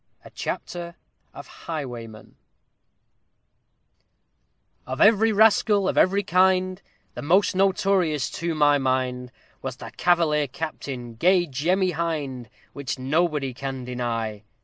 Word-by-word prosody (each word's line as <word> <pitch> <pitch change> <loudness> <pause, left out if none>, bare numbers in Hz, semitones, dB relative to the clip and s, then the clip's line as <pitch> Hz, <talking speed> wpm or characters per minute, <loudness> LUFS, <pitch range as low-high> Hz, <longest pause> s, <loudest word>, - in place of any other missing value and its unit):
A - - -12
CHAPTER 170 -1 -5 0.4
OF - - -10
HIGHWAYMEN 120 -9 -8 2.5
Of 130 +1 -5
every 220 +1 +5
rascal 210 -2 +4
of - - 0
every 200 +2 +3
kind, 185 0 +2 0.3
The - - -7
most 185 +6 +2
notorious 190 -6 +1
to 170 -1 -3
my 145 -1 +4
mind, 130 -1 -1 0.3
Was 130 -2 -5
the - - -10
Cavalier 160 -4 +2
Captain, 130 -4 -6
gay 175 +9 +3
JEMMY 175 +6 0
HIND! 150 -8 -3 0.3
_Which 140 -2 -4
nobody 145 0 0
can 135 0 -5
deny. 115 -4 -3
155 Hz, 110 wpm, -24 LUFS, 130-185 Hz, 2.5 s, every